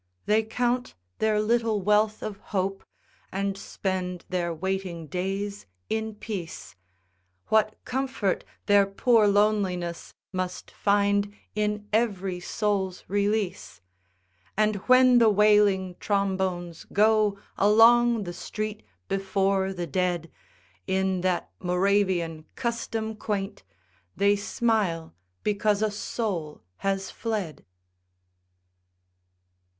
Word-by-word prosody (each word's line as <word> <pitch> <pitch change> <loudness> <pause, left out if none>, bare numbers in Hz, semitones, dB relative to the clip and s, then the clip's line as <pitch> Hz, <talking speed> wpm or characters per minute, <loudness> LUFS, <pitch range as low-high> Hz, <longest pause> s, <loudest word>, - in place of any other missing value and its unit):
They 215 +1 +4
count 245 +3 -1 0.2
their 215 -1 +2
little 225 0 +1
wealth 210 +2 +2
of 210 -2 -4
hope 195 -1 -2 0.5
And 195 0 -1
spend 185 -2 -4
their 175 -2 -1
waiting 180 0 -3
days 195 - -3 0.2
in 220 -1 -2
peace, 195 - -6 0.7
What 215 0 +3
comfort 255 -7 -1 0.2
their 205 -1 +5
poor 220 +2 +3
loneliness 200 -4 +1 0.2
Must 185 -1 -4
find 205 0 +2 0.2
in 210 0 -1
every 195 -5 0
soul's 190 -1 -1
release! 205 - -1 0.8
And 215 -1 +2
when 255 -1 +7
the 230 -2 +6
wailing 205 -3 +4
trombones 190 -4 -1
go 215 -1 +3 0.2
Along 230 +2 +5
the 175 -2 -6
street 215 +3 -5 0.3
before 195 0 0
the 175 -2 -4
dead 175 0 -1 0.6
In 190 -1 +1
that 180 -1 -1
Moravian 180 -3 +1
custom 225 -2 -3
quaint, 205 -2 -3 0.5
They 200 0 +4
smile 205 -6 0 0.3
because 210 0 +1
a 215 - +1
soul 200 -7 -4
has 195 - -2
fled. 210 -9 -4
200 Hz, 100 wpm, -26 LUFS, 185-215 Hz, 0.8 s, when